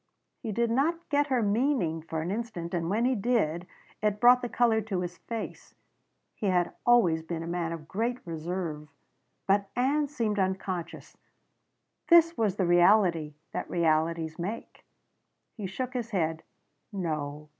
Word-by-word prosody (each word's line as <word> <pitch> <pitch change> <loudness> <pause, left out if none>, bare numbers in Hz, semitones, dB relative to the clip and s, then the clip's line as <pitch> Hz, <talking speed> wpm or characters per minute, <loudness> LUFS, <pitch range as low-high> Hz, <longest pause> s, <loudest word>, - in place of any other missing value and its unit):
He 225 - -4
did 235 +2 0
not 330 +7 0
get 290 0 +2
her 255 -4 +1
meaning 205 - +1
for 160 0 -4
an 175 - -3
instant 205 -6 -4
and 170 -1 -1
when 220 +5 +1
he 260 - +3
did 195 -7 0 0.3
it 210 -1 0
brought 245 +2 +7
the 245 - -3
color 230 -2 +2
to 195 -4 -3
his 180 0 -5
face; 230 -2 -7 0.6
he 210 - -3
had 180 -2 +1
always 185 -10 +5
been 165 0 -5
a - - -6
man 170 -1 -2
of 160 -2 -7
great 230 +8 -1
reserve. 165 -2 -4 0.6
But 200 0 +2
Ann 285 +4 +2
seemed 230 -8 -1
unconscious. 190 -2 -3 0.9
This 335 -1 +6
was 210 -4 +1
the 190 - +1
reality 175 -3 +4 0.2
that - - -4
realities 160 -1 0
make. 205 +7 -6 0.7
He 210 -4 -5
shook 250 +7 -4
his 240 -3 -3
head. 160 -6 -1 0.5
"No. 150 -6 -4
195 Hz, 155 wpm, -28 LUFS, 165-235 Hz, 0.9 s, brought